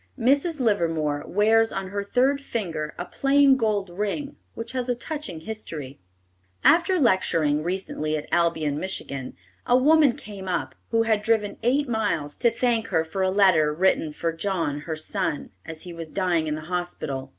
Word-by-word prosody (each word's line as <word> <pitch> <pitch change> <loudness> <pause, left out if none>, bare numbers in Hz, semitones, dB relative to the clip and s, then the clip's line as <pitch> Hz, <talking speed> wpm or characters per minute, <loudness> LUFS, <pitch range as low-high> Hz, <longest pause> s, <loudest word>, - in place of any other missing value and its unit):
Mrs. 280 +6 +2
Livermore 165 - 0
wears 225 +3 +3
on 195 -1 -4
her 200 +1 -3
third 265 +7 +2
finger 165 - -4
a 175 - -4
plain 275 +2 +4
gold 210 -6 0
ring 210 - -3 0.2
which 230 0 -6
has 255 -1 -3
a 245 - +2
touching 240 - -5
history. 160 -10 -7 0.6
After 350 +2 +4
lecturing 165 - +2
recently 160 -3 -2
at 150 - -7
Albion, 160 -4 +1
Mich., 190 +2 -1 0.7
a 245 - +5
woman 295 0 +5
came 200 -2 -9
up, 180 - -2 0.2
who 225 0 +2
had 220 -2 +2
driven 215 -2 0
eight 275 +5 +2
miles, 170 -11 -1
to 240 - +3
thank 230 -1 0
her 160 0 +1
for 190 +4 -4
a 190 - +2
letter 185 -6 +4
written 165 -1 +1
for 165 +2 -2
John, 165 -5 -2
her 160 - -1
son, 160 0 -3 0.2
as 160 -1 -6
he 180 -2 -8
was 165 -1 -7
dying 175 -3 0
in 150 - -1
the 155 - -6
hospital. 155 -6 -4
190 Hz, 170 wpm, -25 LUFS, 160-230 Hz, 0.7 s, a